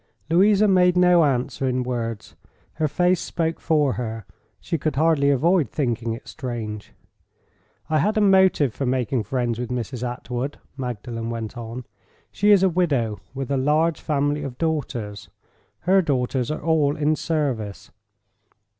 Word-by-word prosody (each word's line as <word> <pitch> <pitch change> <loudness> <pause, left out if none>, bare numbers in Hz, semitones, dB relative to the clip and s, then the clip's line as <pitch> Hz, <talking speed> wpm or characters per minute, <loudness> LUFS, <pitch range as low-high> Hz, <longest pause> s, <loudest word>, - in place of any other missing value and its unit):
Louisa 200 +4 +5
made 180 -2 +4
no 180 -2 +5
answer 135 -1 0
in 130 0 0
words. 115 -3 -4 0.5
Her 155 - +3
face 180 +4 +2
spoke 165 -1 -2
for 150 -5 +2
her: 115 -3 -5 0.3
she 165 -3 -3
could 155 -1 -1
hardly 150 -1 +3
avoid 155 - +2
thinking 120 -5 -1
it 115 - -10
strange. 110 -5 -6 1.0
"I 155 -1 +1
had 215 +8 +1
a - - +3
motive 190 - +4
for 135 - -3
making 125 -1 0
friends 120 0 -1
with 120 -1 -4
Mrs. 125 0 -4
Attwood," 125 +2 -4 0.2
Magdalen 120 -3 -5
went 115 0 -5
on. 120 +1 -7 0.5
"She 205 - +1
is 200 -2 +6
a - - +6
widow, 145 - 0 0.2
with 135 0 -4
a 140 - +1
large 155 +5 +1
family 145 0 0
of 130 -3 -6
daughters. 115 - -3 0.5
Her 190 +2 +4
daughters 130 -5 -1
are 155 - -4
all 150 -3 +2
in 150 +1 +2
service. 135 - -3
140 Hz, 150 wpm, -23 LUFS, 120-160 Hz, 1.0 s, is